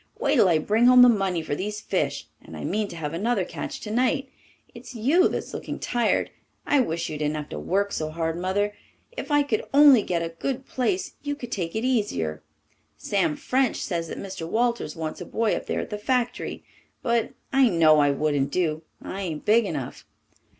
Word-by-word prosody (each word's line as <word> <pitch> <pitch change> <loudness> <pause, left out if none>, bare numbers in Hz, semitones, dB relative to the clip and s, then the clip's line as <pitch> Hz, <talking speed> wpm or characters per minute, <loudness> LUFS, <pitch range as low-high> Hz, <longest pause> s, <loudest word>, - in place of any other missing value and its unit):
Wait - - +1
till 220 -9 +5
I 165 - +4
bring 215 +9 +3
home 250 0 +8
the - - +9
money 195 -7 +1
for 145 - -3
these 210 +7 -3
fish. - - -2 0.2
And - - -11
I - - -7
mean 215 -1 -1
to 170 - -9
have 150 -2 -4
another 200 +2 0
catch - - -6
tonight. 255 +5 0 0.4
It's 255 - -11
you 290 - +4
that's - - -4
looking - - -5
tired. 240 -1 0 0.3
I 290 - +3
wish 170 -8 -1
you 150 - -5
didn't 150 0 -1
have 150 -1 -5
to 75 - -5
work 200 - 0
so 155 -1 -2
hard, 165 0 -2
Mother. 190 +4 -1 0.4
If - - -6
I 290 -1 +4
could 235 -7 -1
only 285 -5 +8
get 170 -4 -1
a 165 - -3
good 260 +10 -4
place 330 +8 -1
you 290 0 -3
could 245 -5 -9
take 170 -3 -3
it 220 +3 -1
easier. 200 - -1 0.6
Sam 190 -7 0
French 260 - +1
says 170 -3 -2
that - - -6
Mr. 190 -4 -6
Walters 235 -7 0
wants 160 -1 -5
a - - -5
boy 225 -1 0
up - - -6
there - - -1
at - - -8
the 210 - -4
factory, 245 +2 -1 0.4
but 235 -2 0 0.2
I 265 -2 +5
know 160 -4 +5
I 145 -1 +4
wouldn't 140 -1 0
do. 160 -4 0 0.2
I 195 - -5
ain't 160 -5 -4
big 225 +2 +4
enough. 145 -9 -5
205 Hz, 205 wpm, -25 LUFS, 165-245 Hz, 0.6 s, the